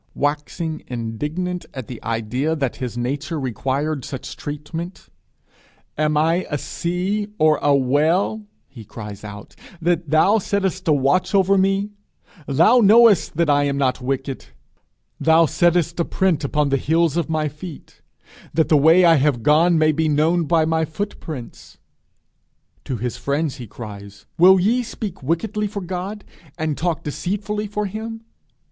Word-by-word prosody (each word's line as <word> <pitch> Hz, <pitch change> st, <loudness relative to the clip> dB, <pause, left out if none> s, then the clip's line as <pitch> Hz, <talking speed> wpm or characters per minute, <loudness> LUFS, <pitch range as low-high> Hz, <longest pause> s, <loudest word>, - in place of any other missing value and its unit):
Waxing 150 Hz, +2 st, -2 dB
indignant 150 Hz, +10 st, -4 dB
at 130 Hz, -3 st, -5 dB
the 120 Hz, -1 st, -9 dB
idea 115 Hz, +7 st, -1 dB
that 135 Hz, -5 st, -2 dB
his 125 Hz, -2 st, -5 dB
nature 140 Hz, +6 st, -3 dB
required 135 Hz, +3 st, -2 dB
such 130 Hz, +1 st, -7 dB
treatment 160 Hz, +5 st, -7 dB, 0.9 s
'Am 150 Hz, 0 st, +1 dB
I 165 Hz, +4 st, +1 dB
a 145 Hz, -, -1 dB
sea 185 Hz, +8 st, -2 dB
or 155 Hz, -1 st, +3 dB
a 145 Hz, -1 st, +4 dB
whale,' 155 Hz, +11 st, +1 dB, 0.3 s
he 120 Hz, -5 st, -12 dB
cries 105 Hz, -1 st, -9 dB
out, 105 Hz, -1 st, -10 dB, 0.2 s
'that 170 Hz, -1 st, 0 dB
thou 190 Hz, +8 st, +4 dB
settest 190 Hz, -2 st, -2 dB
a -, -, +4 dB
watch 145 Hz, +8 st, +2 dB
over 195 Hz, 0 st, +4 dB
me?' 195 Hz, +2 st, +1 dB, 0.6 s
Thou 170 Hz, -, +5 dB
knowest 220 Hz, -6 st, +5 dB
that 170 Hz, -1 st, +2 dB
I 145 Hz, -1 st, +3 dB
am 140 Hz, -1 st, -1 dB
not 135 Hz, -2 st, 0 dB
wicked. 135 Hz, +1 st, -3 dB, 0.7 s
'Thou 160 Hz, +1 st, +5 dB
settest 170 Hz, +1 st, +1 dB
a 170 Hz, -, +2 dB
print 180 Hz, -6 st, 0 dB
upon 145 Hz, +1 st, 0 dB
the 135 Hz, -, +2 dB
heels 160 Hz, +2 st, +1 dB
of 170 Hz, -1 st, -1 dB
my 155 Hz, -1 st, 0 dB
feet!' 150 Hz, +2 st, -10 dB, 0.5 s
that 160 Hz, -1 st, +2 dB
the 155 Hz, -, +5 dB
way 165 Hz, +5 st, +6 dB
I 165 Hz, -2 st, +6 dB
have 135 Hz, -4 st, +1 dB
gone 165 Hz, +5 st, +4 dB
may 155 Hz, 0 st, +4 dB
be 155 Hz, +1 st, 0 dB
known 160 Hz, +3 st, +2 dB
by 160 Hz, 0 st, +2 dB
my 160 Hz, 0 st, +1 dB
footprints! 160 Hz, -, -7 dB, 1.1 s
To 130 Hz, -, -3 dB
his 120 Hz, +2 st, -4 dB
friends 140 Hz, +1 st, -2 dB
he 120 Hz, -, -8 dB
cries: 100 Hz, -2 st, -10 dB
'Will 190 Hz, +2 st, +7 dB
ye 225 Hz, +7 st, +2 dB
speak 215 Hz, -6 st, -6 dB
wickedly 170 Hz, +9 st, -1 dB
for 200 Hz, 0 st, -5 dB
God? 185 Hz, +3 st, -5 dB, 0.3 s
and 155 Hz, -2 st, -1 dB
talk 170 Hz, 0 st, -2 dB
deceitfully 210 Hz, +7 st, -3 dB
for 210 Hz, +1 st, -3 dB
him?' 220 Hz, +3 st, -6 dB
160 Hz, 155 wpm, -21 LUFS, 140-180 Hz, 1.1 s, Will